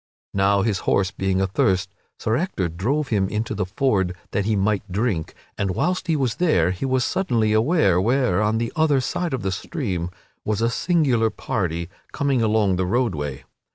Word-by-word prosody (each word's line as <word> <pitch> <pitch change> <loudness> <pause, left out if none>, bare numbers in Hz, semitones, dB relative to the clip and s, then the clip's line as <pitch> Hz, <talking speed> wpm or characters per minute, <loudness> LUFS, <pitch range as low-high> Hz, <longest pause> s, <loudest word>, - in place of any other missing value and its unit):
Now, 100 0 +3
his 105 -4 0
horse 95 -2 +2
being 95 0 0
athirst, 95 0 +1 0.2
Sir 110 -1 0
Ector 125 - -1
drove 130 - -1
him 100 -4 +1
into 110 +1 -2
the 100 -3 -2
ford 95 -4 0 0.2
that 105 - 0
he 110 0 +1
might 100 0 0
drink, 100 -5 -1 0.2
and 95 -2 0
whilst 185 0 0
he 165 - +2
was 130 -6 0
there 90 - +3
he 95 +8 -3
was 130 -2 +1
suddenly 115 - +1
aware 110 - +3
where, 120 -3 +2
on 105 +1 +1
the 115 0 -2
other 155 -3 +3
side 175 +6 -2
of 130 - -3
the 95 - 0
stream, 95 - -3 0.3
was 105 -1 -1
a 115 +1 +1
singular 130 -9 +2
party 90 -9 -3 0.3
coming 140 -4 +1
along 105 -4 +2
the 95 - 0
roadway. 75 - -1
110 Hz, 180 wpm, -23 LUFS, 95-130 Hz, 0.3 s, Now